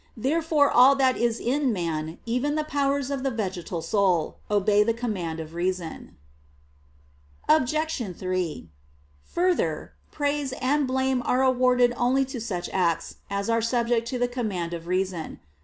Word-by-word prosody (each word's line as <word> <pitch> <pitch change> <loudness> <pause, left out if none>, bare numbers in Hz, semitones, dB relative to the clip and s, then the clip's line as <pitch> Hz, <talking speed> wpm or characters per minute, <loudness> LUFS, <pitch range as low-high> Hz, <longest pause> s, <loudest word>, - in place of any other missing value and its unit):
Therefore 300 +3 +2
all 260 +3 +7
that 265 -2 +3
is 235 -1 0
in 270 +1 +1
man, 165 -4 -3
even 250 +6 0
the 310 - 0
powers 280 -2 0
of 275 -2 -2
the 270 - 0
vegetal 185 -7 -4
soul, 180 -3 +1
obey 205 0 +3
the 225 +2 +2
command 190 -9 -3
of 160 0 -7
reason. 175 -1 -4 1.3
Obj. 310 +2 +2 0.2
3: 185 - -3 0.5
Further, 360 - -1 0.2
praise 285 -2 -1
and 275 +2 +1
blame 260 0 +1
are 255 +1 +2
awarded 250 -1 +3
only 255 +3 +2
to 260 -3 -6
such 185 -6 -3
acts 170 -3 0
as 200 0 -2
are 230 0 +2
subject 235 0 0
to 255 - -2
the 245 0 +1
command 205 -9 -3
of 170 0 -6
reason. 185 - -2
235 Hz, 145 wpm, -25 LUFS, 185-265 Hz, 1.3 s, all